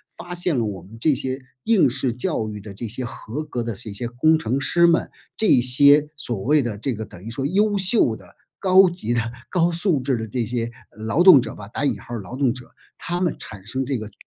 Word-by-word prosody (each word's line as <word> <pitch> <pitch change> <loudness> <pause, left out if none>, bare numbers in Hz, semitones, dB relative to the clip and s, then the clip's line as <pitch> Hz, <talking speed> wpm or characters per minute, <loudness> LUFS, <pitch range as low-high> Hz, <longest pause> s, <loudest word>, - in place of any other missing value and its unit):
发 175 0 -8
现 175 -4 +1
了 115 - 0
我 100 -4 -5
们 110 +4 -14
这 150 +4 +2
些 130 +1 -3 0.2
应 210 - +3
试 125 0 -1
教 125 -3 -2
育 105 -1 -7
的 100 0 -10
这 105 +4 -6
些 120 +4 -3
合 120 +4 -6
格 120 -5 -4
的 115 0 -4
这 105 +2 -5
些 120 +4 -4
工 145 +7 +2
程 130 -3 -2
师 170 +6 +3
们， 170 0 +2 0.3
这 215 - +4
些 140 +4 +6
所 120 -8 -3
谓 150 +2 +3
的 120 -5 -4
这 130 +5 -2
个 110 0 -6
等 90 - -14
于 110 - -7
说 135 +4 -4
优 205 +6 +1
秀 190 - +3
的， - - -17 0.2
高 190 0 +5
级 175 -10 -3
的、 120 - +1 0.3
高 175 -1 +1
素 170 -2 +2
质 130 -1 0
的 110 0 -5
这 120 +3 -2
些 115 0 -3 0.3
“劳 110 +10 0
动 180 -8 +9
者” - - -6
吧， 100 - -10
打 130 - -4
引 120 -7 -1
号 120 - -10
的 120 - -3
“劳 100 +6 -9
动 135 -4 +1
者”， 125 -2 -10 0.3
他 175 +1 -3
们 175 -3 0
产 100 -3 -8
生 130 +5 -3
这 135 0 -2
个 110 -1 -8
130 Hz, 260 characters per minute, -22 LUFS, 115-165 Hz, 0.3 s, 动